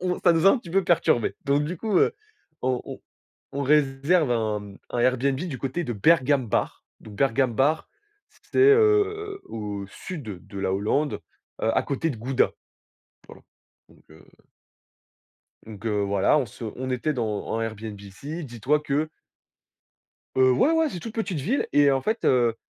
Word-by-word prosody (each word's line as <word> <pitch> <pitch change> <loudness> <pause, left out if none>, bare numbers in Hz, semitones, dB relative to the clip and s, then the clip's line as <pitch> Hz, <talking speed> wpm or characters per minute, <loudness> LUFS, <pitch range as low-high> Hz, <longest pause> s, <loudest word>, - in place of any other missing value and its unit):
On 180 0 -1
ça 175 - +6
nous 165 +3 +2
a - - +9
un 265 - +2
petit 170 -7 -11
peu 195 +1 +2
perturbé, 140 -9 +2
donc 140 +1 +2
du 170 +4 -4
coup, 210 0 -1
heu, - - +3 0.5
on 125 -1 0
on - - -8 0.5
on 140 +1 -3
réserve 145 +1 +2
un 105 -3 -2 0.2
un 120 - -1
Airbnb 130 +2 +2
du 160 -4 -4
côté 135 +7 -3
de 120 - -3
Bergambacht, 130 0 +2 0.3
donc 105 - -12
heu, - - -11
Bergambacht, 135 +3 +1 0.6
c'est, - - -3
heu, 420 -1 +4
au 105 -3 -5
sud 110 - -8
de 100 - -7
la 95 - 0
Hollande, 125 +10 0 0.4
heu, 115 0 +1
à - - +4
côté 145 +4 -1
de 115 - -8
Gouda. 125 +4 +1 0.8
Tu - - -14
vois? - - -18 0.5
Donc - - -23
heu 80 0 -16 1.4
donc 110 0 -11
heu, 105 -2 0
voilà, 100 +7 +3
on 135 - +1
se 115 - -11
on 130 +1 -4
était 130 +4 -1
dans 110 -5 -2
en 115 - -2
Airbnb 110 -2 -5
ici, 140 - -7
dis-toi 130 +3 0
que 150 +2 -1 1.3
Heu, 130 0 +5
ouais, 265 - +3
ouais, 325 -1 +2
c'est 180 - -6
toute 220 +6 -7
petite 205 -8 -2
ville 235 - 0
et 145 -1 +5
en 135 -1 +1
fait, 220 +2 -2
heu, 120 -3 +3
135 Hz, 175 wpm, -25 LUFS, 115-170 Hz, 1.4 s, a